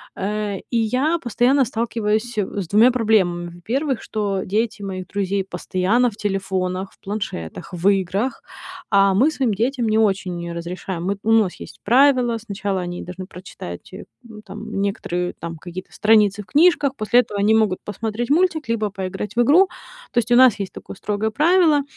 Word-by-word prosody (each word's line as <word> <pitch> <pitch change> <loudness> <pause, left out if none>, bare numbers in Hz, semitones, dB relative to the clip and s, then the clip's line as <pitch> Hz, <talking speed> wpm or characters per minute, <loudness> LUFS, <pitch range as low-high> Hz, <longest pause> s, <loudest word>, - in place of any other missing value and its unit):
э, 205 0 -3
и 235 - 0
я 255 +9 +1
постоянно 255 +1 +2
сталкиваюсь 225 -1 -2
с 195 -3 -2
двумя 220 +6 +5
проблемами: 185 -8 +1
во-первых, 260 - -2
что 200 -3 -2
дети 215 +1 -1
моих 185 -2 -5
друзей 200 -1 -1
постоянно 190 +6 0
в 205 - -16
телефонах, 190 -1 -2
в - - -28
планшетах, 195 - -6
в 180 +3 +2
играх, 195 +6 -1 0.5
а 195 -1 +5
мы 275 +10 +4
своим 260 -8 0
детям 240 +2 0
не 215 - +2
очень 190 -5 0
разрешаем. 175 +1 -5
Мы 200 +1 -1
ну, 225 - +1
у - - +4
нас 180 - -5
есть - - -11
правило: 250 0 +4
сначала 200 -3 -3
они 175 0 -5
должны 185 +1 -7
прочитать, 180 - -10
э, 195 - -8 0.2
ну, 220 -3 -12
там 195 -1 -7
некоторые 180 -3 -2
там 165 0 -6
какие-то 180 +3 -9
страницы 210 -2 +3
в - - -24
книжках, 295 -3 +3
после 235 +2 +3
этого 210 -3 -6
они 215 +2 +4
могут 215 -4 +2
посмотреть 220 +3 -4
мультик 325 -2 +2
либо 215 -2 0
поиграть 195 +2 -5
в 240 - +3
игру, 330 +11 +5 0.4
то - - -8
есть 240 +1 -3
у - - +6
нас 255 -4 +6
есть 195 - -4
такое - - -10
строгое 210 +2 -2
правило. 315 +1 +4
210 Hz, 175 wpm, -21 LUFS, 190-240 Hz, 0.5 s, у